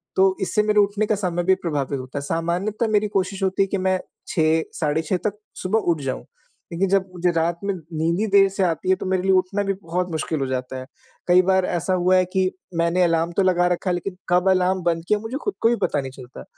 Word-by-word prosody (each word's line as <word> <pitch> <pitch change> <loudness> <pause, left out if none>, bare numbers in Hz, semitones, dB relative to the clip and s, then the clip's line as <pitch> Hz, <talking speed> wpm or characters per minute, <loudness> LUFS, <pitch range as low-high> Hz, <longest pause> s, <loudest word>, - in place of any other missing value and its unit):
तो 190 0 +4
इससे 210 +2 +1
मेरे 210 0 +3
उठने 205 +1 +2
का 215 - +2
समय 175 -3 -1
भी 190 +1 +4
प्रभावित 145 -5 -2
होता 130 +2 -7
है, - - -6
सामान्यतः 180 +9 -1
मेरी 210 0 +2
कोशिश 190 +1 -2
होती 190 +1 +2
है 195 - -2
कि 200 - -2
मैं 185 0 +1 0.3
6 160 0 +2 0.2
साढ़े 155 0 +1
6 170 +3 -1
तक 210 0 -4 0.3
सुबह 200 +4 +2
उठ 160 -3 -2
जाऊँ, 130 -2 -4 0.5
लेकिन 185 +3 0
जब 195 -1 +2
मुझे 180 0 +1
रात 165 +1 0
में 200 - 0
नींद 165 +1 -2
ही 220 - +1
देर 195 -1 +6
से 195 0 -1
आती 170 0 -1
है, 190 - +5
तो - - -7
मेरे 185 -1 0
लिए 190 - +2
उठना 190 +2 +2
भी 195 0 0
बहुत 180 +1 -2
मुश्किल 160 0 -2
हो 135 - 0
जाता 130 0 -3
है। 130 - -8 0.4
कई 180 +1 +6
बार 190 0 +2
ऐसा 180 +2 -1
हुआ 185 +1 +3
है 185 - +3
कि 185 -1 +2 0.3
मैंने 170 +2 +2
अलार्म 165 0 +1
तो 195 - +4
लगा 180 -1 +3
रखा 180 +1 -1
है 180 - +2
लेकिन 180 +2 -5
कब 180 +2 +3
अलार्म 185 0 +2
बंद 165 -1 0
किया, 210 - +2
मुझे 225 +5 -5
खुद 405 - -1
को 225 - +4
भी 240 - +2
पता 145 - +1
नहीं 135 -1 -7
चलता, 125 - -11
180 Hz, 250 wpm, -22 LUFS, 165-195 Hz, 0.5 s, देर